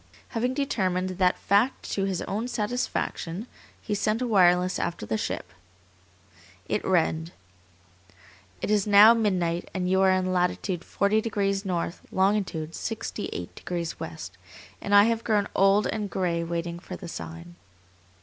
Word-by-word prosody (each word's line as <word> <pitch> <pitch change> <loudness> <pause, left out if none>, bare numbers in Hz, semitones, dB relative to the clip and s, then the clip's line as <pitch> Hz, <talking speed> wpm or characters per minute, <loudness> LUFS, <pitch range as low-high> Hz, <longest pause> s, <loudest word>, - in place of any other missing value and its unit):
Having 245 +2 -1
determined 185 -10 0
that 180 -1 +3
fact 210 +7 +1
to 195 - 0
his 190 -3 -2
own 215 +5 -3
satisfaction, 210 -5 -2 0.3
he 210 - -4
sent 215 +2 0
a 250 - -1
wireless 180 -4 +3
after 170 -11 -3
the 110 - -1
ship. 105 - -4 1.1
It - - -1
read: 165 -2 +1 1.3
"It - - 0
is 210 -1 +2
now 210 +2 +9
midnight 180 -7 0
and 180 -1 -1
you 190 +1 +3
are 190 - +5
in 185 0 +1
latitude 180 0 -1
40 205 +4 +1
degrees 200 -2 -1
north, 175 -2 -2
longitude 190 -5 0
68 215 - -5
degrees 170 -2 -5
west, 85 +3 -8 0.4
and 205 - +1
I 205 - +9
have 230 +1 +1
grown 205 -3 +1
old 195 +2 +4
and 210 -2 -2
gray 170 -3 -1
waiting 170 0 -3
for 180 +1 -8
the 180 - -9
sign." 85 - -8
190 Hz, 145 wpm, -26 LUFS, 170-210 Hz, 1.3 s, now